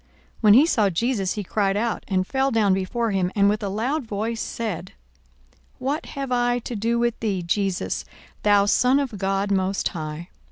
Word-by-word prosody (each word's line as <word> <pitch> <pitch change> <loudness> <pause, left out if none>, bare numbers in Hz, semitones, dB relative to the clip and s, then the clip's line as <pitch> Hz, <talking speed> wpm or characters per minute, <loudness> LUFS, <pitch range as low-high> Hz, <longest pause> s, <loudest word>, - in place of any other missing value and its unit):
42:008:028 - - -36 0.3
When 210 -2 +7
he 275 +6 +7
saw 220 - +2
Jesus, 195 +1 0
he 210 - -4
cried 195 +1 0
out, 230 +1 -1
and 185 -2 +1
fell 270 +5 0
down 215 -5 +3
before 215 +5 -1
him, 185 -2 0
and 200 -1 +4
with 210 +1 +1
a 200 - -2
loud 250 +10 -1
voice 220 +1 -3
said, 200 -6 -4 0.8
What 290 +5 -2
have 275 -2 -3
I 245 0 +2
to 240 0 -5
do 230 +3 0
with 235 -1 0
thee, 200 -5 -1
Jesus, 190 +1 -1 0.4
thou 205 -1 +4
Son 250 +6 +3
of 255 -8 -3
God 195 +1 0
most 190 0 0
high? 155 0 -6
210 Hz, 190 wpm, -23 LUFS, 195-235 Hz, 0.8 s, When